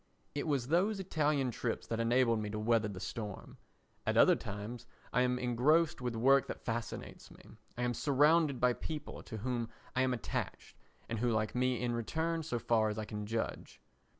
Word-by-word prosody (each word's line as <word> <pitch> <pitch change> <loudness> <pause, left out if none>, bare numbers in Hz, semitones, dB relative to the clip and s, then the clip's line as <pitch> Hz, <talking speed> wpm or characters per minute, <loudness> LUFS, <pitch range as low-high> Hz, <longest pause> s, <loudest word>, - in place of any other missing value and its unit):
It 145 +2 -3
was 135 -4 0
those 195 +6 +2
Italian 150 -7 +1
trips 115 0 -3
that 115 - -3
enabled 115 0 +3
me 105 -1 -3
to 105 - -4
weather 110 0 +2
the 100 -3 -6
storm. 95 +2 -6 0.5
At - - 0
other - - +7
times 105 +4 -6 0.3
I 125 - +4
am 125 0 +2
engrossed 130 +7 +2
with 125 -2 -2
work 135 +4 +4
that - - -7
fascinates 115 0 -4
me. - - -15 0.3
I 120 - -1
am 120 0 +1
surrounded 145 +1 +3
by 125 0 +4
people 150 +3 -6
to 110 - -7
whom 120 +1 -2 0.3
I 130 - +3
am 130 0 +2
attached 115 - -4 0.3
and 115 - -3
who 120 +1 +2
like 110 -1 0
me 125 0 +1
in 120 -1 -1
return 160 +8 -1
so 150 -6 -2
far 110 -2 +2
as 105 - -4
I 110 - -3
can 105 -1 -5
judge. 115 +1 -3
120 Hz, 190 wpm, -33 LUFS, 115-140 Hz, 0.5 s, other